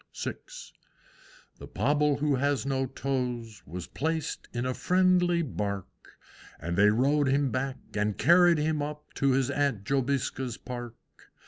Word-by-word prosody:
VI. -, -, -2 dB, 1.3 s
The -, -, -9 dB
Pobble 150 Hz, 0 st, +1 dB
who 145 Hz, -3 st, +2 dB
has 140 Hz, +1 st, 0 dB
no 135 Hz, -1 st, 0 dB
toes 125 Hz, -5 st, -3 dB
Was 85 Hz, +3 st, -6 dB
placed 160 Hz, +2 st, -3 dB
in 120 Hz, 0 st, -3 dB
a 130 Hz, -, 0 dB
friendly 180 Hz, +1 st, +3 dB
Bark, 100 Hz, -, -5 dB, 0.4 s
And 85 Hz, +3 st, -3 dB
they 105 Hz, +3 st, +6 dB
rowed 140 Hz, +6 st, +2 dB
him 135 Hz, 0 st, +2 dB
back, 130 Hz, +2 st, -2 dB, 0.2 s
and 105 Hz, 0 st, -1 dB
carried 175 Hz, +2 st, +5 dB
him 155 Hz, 0 st, 0 dB
up 150 Hz, +1 st, -6 dB
To 140 Hz, -1 st, +3 dB
his 130 Hz, -1 st, +1 dB
Aunt 140 Hz, -8 st, 0 dB
Jobiska's 130 Hz, -1 st, -1 dB
Park. 120 Hz, -2 st, -7 dB
135 Hz, 140 wpm, -28 LUFS, 120-150 Hz, 1.3 s, they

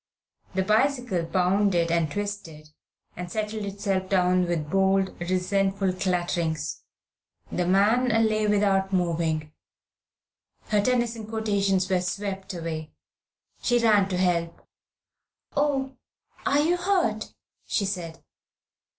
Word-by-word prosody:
The 190 Hz, -, +2 dB
bicycle 225 Hz, -2 st, +1 dB
bounded, 180 Hz, -1 st, +2 dB
and 165 Hz, -3 st, +1 dB
twisted, 170 Hz, -7 st, -5 dB, 0.4 s
and 175 Hz, 0 st, -6 dB
settled 215 Hz, -1 st, -3 dB
itself 195 Hz, -1 st, -2 dB
down 180 Hz, -1 st, +3 dB
with 165 Hz, -3 st, -1 dB
bold, 195 Hz, 0 st, +2 dB
resentful 190 Hz, +2 st, 0 dB
clatterings. 175 Hz, -4 st, -1 dB, 0.7 s
The 180 Hz, -1 st, -1 dB
man 210 Hz, +7 st, +3 dB
lay 220 Hz, -2 st, +2 dB
without 200 Hz, -2 st, +2 dB
moving. 165 Hz, -4 st, 0 dB, 1.2 s
Her 210 Hz, -1 st, +3 dB
Tennyson 235 Hz, -1 st, 0 dB
quotations 200 Hz, -4 st, +1 dB
were 185 Hz, -2 st, +1 dB
swept 195 Hz, +1 st, -4 dB
away. 160 Hz, -2 st, -5 dB, 0.7 s
She 245 Hz, -, +2 dB
ran 210 Hz, -4 st, +4 dB
to 185 Hz, -, -1 dB
help. 170 Hz, -2 st, -1 dB, 0.9 s
"Oh, 275 Hz, -2 st, 0 dB, 0.5 s
are 280 Hz, -, +3 dB
you 340 Hz, +4 st, +2 dB
hurt?" 350 Hz, -, 0 dB, 0.3 s
she 200 Hz, -, 0 dB
said. 175 Hz, -4 st, -5 dB
195 Hz, 105 wpm, -26 LUFS, 180-215 Hz, 1.2 s, ran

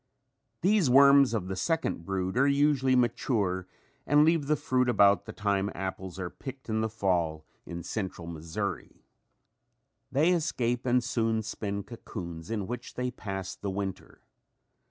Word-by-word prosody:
These 190 Hz, -5 st, +3 dB
worms 140 Hz, 0 st, +7 dB
of 95 Hz, -5 st, -2 dB
the 95 Hz, -, -3 dB
second 160 Hz, -, -1 dB
brood 95 Hz, 0 st, -2 dB
are 135 Hz, +3 st, +4 dB
usually 140 Hz, -2 st, +3 dB
mature 110 Hz, -6 st, 0 dB, 0.4 s
and 145 Hz, +1 st, +5 dB
leave 160 Hz, -3 st, +2 dB
the 150 Hz, -, +3 dB
fruit 130 Hz, -3 st, +1 dB
about 100 Hz, -3 st, +4 dB
the -, -, -7 dB
time 100 Hz, -1 st, 0 dB
apples 95 Hz, -1 st, -5 dB
are 95 Hz, -2 st, -4 dB
picked 130 Hz, -2 st, -9 dB
in 110 Hz, 0 st, 0 dB
the 110 Hz, -, 0 dB
fall 85 Hz, -7 st, -1 dB, 0.2 s
in 85 Hz, 0 st, -6 dB
central 95 Hz, -2 st, -4 dB
Missouri. 80 Hz, -1 st, -5 dB, 1.1 s
They 150 Hz, +6 st, +3 dB
escape 125 Hz, -8 st, 0 dB
and 125 Hz, 0 st, +3 dB
soon 115 Hz, -2 st, 0 dB
spin 100 Hz, -2 st, -4 dB
cocoons 85 Hz, -8 st, -8 dB
in 110 Hz, -4 st, -2 dB
which 120 Hz, +3 st, -6 dB
they 125 Hz, 0 st, -2 dB
pass 95 Hz, -5 st, -5 dB
the 100 Hz, -, -5 dB
winter. 95 Hz, -1 st, -5 dB
110 Hz, 150 wpm, -29 LUFS, 95-130 Hz, 1.1 s, worms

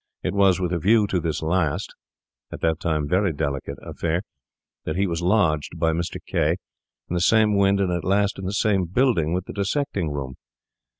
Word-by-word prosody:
It -, -, -1 dB
was 95 Hz, -2 st, +4 dB
with 90 Hz, -1 st, -1 dB
a 85 Hz, -, 0 dB
view 105 Hz, +5 st, +4 dB
to 95 Hz, -2 st, 0 dB
this 80 Hz, -1 st, -2 dB
last—at 80 Hz, -6 st, -4 dB
that 80 Hz, 0 st, 0 dB
time 80 Hz, -4 st, -1 dB
very 95 Hz, +3 st, +2 dB
delicate—affair 75 Hz, +4 st, -3 dB, 0.6 s
that 80 Hz, -, -3 dB
he 95 Hz, +2 st, +1 dB
was 85 Hz, -2 st, -2 dB
lodged 85 Hz, -5 st, +1 dB
by 80 Hz, 0 st, +2 dB
Mr. 85 Hz, +1 st, -3 dB
K— -, -, +1 dB, 0.5 s
in -, -, -5 dB
the 90 Hz, -, 0 dB
same 110 Hz, +2 st, +4 dB
wynd, 100 Hz, 0 st, +3 dB
and 95 Hz, -2 st, +1 dB
at 85 Hz, -1 st, -2 dB
last 100 Hz, +1 st, +1 dB
in 95 Hz, -, -5 dB
the 95 Hz, -, -2 dB
same 100 Hz, -2 st, +1 dB
building, 95 Hz, -, +1 dB
with 90 Hz, +1 st, -1 dB
the -, -, -8 dB
dissecting 100 Hz, -, -1 dB
rooms. 65 Hz, -3 st, -5 dB
90 Hz, 185 wpm, -23 LUFS, 80-100 Hz, 0.6 s, was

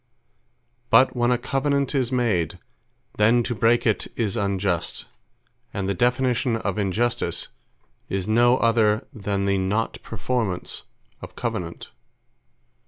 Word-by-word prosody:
But 130 Hz, +4 st, +5 dB
when 120 Hz, 0 st, +2 dB
a 125 Hz, -, +3 dB
Covenant 140 Hz, +2 st, 0 dB
is 130 Hz, -3 st, 0 dB
made, 110 Hz, -, 0 dB, 0.6 s
then 115 Hz, +3 st, +4 dB
to 120 Hz, -, -2 dB
break 115 Hz, +1 st, +2 dB
it 110 Hz, -3 st, +1 dB
is 110 Hz, -2 st, -1 dB
Unjust: 100 Hz, -4 st, -1 dB, 0.7 s
And 100 Hz, -1 st, -2 dB
the 100 Hz, -, +1 dB
definition 125 Hz, +3 st, +1 dB
of 105 Hz, -3 st, -2 dB
INJUSTICE, 105 Hz, +5 st, -1 dB, 0.6 s
is 95 Hz, 0 st, -2 dB
no 120 Hz, +3 st, +4 dB
other 110 Hz, -3 st, +2 dB
than 100 Hz, -2 st, -2 dB
The 100 Hz, -1 st, +1 dB
Not 100 Hz, +4 st, -1 dB
Performance 110 Hz, -4 st, -3 dB, 0.4 s
Of -, -, -10 dB
Covenant. 85 Hz, -1 st, -4 dB
115 Hz, 120 wpm, -24 LUFS, 100-120 Hz, 0.7 s, But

